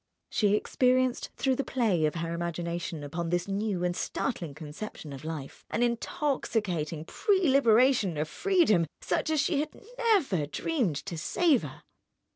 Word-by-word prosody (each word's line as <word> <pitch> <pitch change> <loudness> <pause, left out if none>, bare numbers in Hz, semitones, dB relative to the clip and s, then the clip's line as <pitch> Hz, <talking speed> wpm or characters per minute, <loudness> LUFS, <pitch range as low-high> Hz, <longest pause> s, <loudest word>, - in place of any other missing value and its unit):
She 205 -1 +3
experienced, 255 +3 +1
through 265 -2 +1
the 275 - 0
play 210 -14 +1
of 150 - -3
her 165 0 -2
imagination 170 -2 -3
upon 165 +4 -3
this 175 +1 0
new 200 -2 -1
and 175 0 0
startling 170 - -3
conception 155 0 -8
of 135 - -9
life, 155 -4 -6
an 235 - 0
intoxicating 220 - -1
prelibation 260 - +3
of 150 +1 -1
freedom 315 - +3 0.2
such - - 0
as 310 -1 +2
she 285 +1 +2
had 300 - -4 0.2
never 335 - +2
dreamed 235 - -1
to 170 -5 -4
savour. 255 - +1
200 Hz, 140 wpm, -29 LUFS, 165-265 Hz, 0.2 s, She